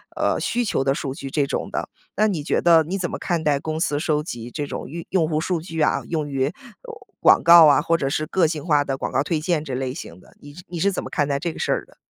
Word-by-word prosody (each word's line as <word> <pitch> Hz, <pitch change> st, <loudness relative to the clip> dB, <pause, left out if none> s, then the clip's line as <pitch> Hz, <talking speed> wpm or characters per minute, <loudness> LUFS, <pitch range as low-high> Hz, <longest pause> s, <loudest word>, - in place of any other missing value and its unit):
呃， -, -, 0 dB
需 245 Hz, +1 st, -1 dB
求 205 Hz, -, 0 dB
的 135 Hz, 0 st, +2 dB
数 135 Hz, -1 st, -4 dB
据”， 135 Hz, -1 st, -7 dB
这 145 Hz, -3 st, +1 dB
种 -, -, -3 dB
的。 -, -, -3 dB, 0.3 s
那 215 Hz, +2 st, +3 dB
你 175 Hz, -8 st, -2 dB
觉 -, -, 0 dB
得 165 Hz, -2 st, +5 dB
你 185 Hz, +5 st, -4 dB
怎 175 Hz, -, -2 dB
么 -, -, -4 dB
看 170 Hz, -3 st, -2 dB
待 145 Hz, -2 st, +2 dB
公 155 Hz, +2 st, -4 dB
司 145 Hz, -3 st, 0 dB
收 150 Hz, -2 st, 0 dB
集 120 Hz, -6 st, -7 dB
这 145 Hz, +1 st, -4 dB
种 -, -, -6 dB
用 170 Hz, +1 st, -6 dB
用 175 Hz, -4 st, +1 dB
户 155 Hz, -1 st, -1 dB
数 175 Hz, 0 st, -1 dB
据 165 Hz, 0 st, -7 dB
啊， -, -, +2 dB
用 155 Hz, -3 st, -2 dB
于， 135 Hz, -2 st, 0 dB
呃， 150 Hz, -, -5 dB, 0.7 s
广 -, -, +5 dB
告 170 Hz, -1 st, +9 dB
啊， 145 Hz, -, +5 dB
或 165 Hz, +1 st, +1 dB
者 135 Hz, -4 st, -1 dB
是 155 Hz, +2 st, -1 dB
个 170 Hz, +1 st, +2 dB
性 155 Hz, -1 st, -4 dB
化 150 Hz, -4 st, +3 dB
的 135 Hz, -, -2 dB
广 -, -, -4 dB
告 130 Hz, -, +1 dB
推 160 Hz, 0 st, -1 dB
荐 160 Hz, -1 st, 0 dB
这 135 Hz, -, -5 dB
类 130 Hz, 0 st, -3 dB
型 90 Hz, -, -9 dB
的， -, -, -20 dB
你 145 Hz, -, -12 dB
是 180 Hz, +4 st, -12 dB
你 175 Hz, -1 st, -6 dB
是 200 Hz, +4 st, +2 dB
怎 185 Hz, -, -4 dB
么 -, -, -7 dB
看 145 Hz, -2 st, 0 dB
待 140 Hz, -1 st, 0 dB
这 170 Hz, +3 st, -2 dB
个 -, -, -10 dB
事 -, -, -1 dB
儿 -, -, -3 dB
的？ -, -, -24 dB
155 Hz, 315 characters per minute, -22 LUFS, 140-170 Hz, 0.7 s, 告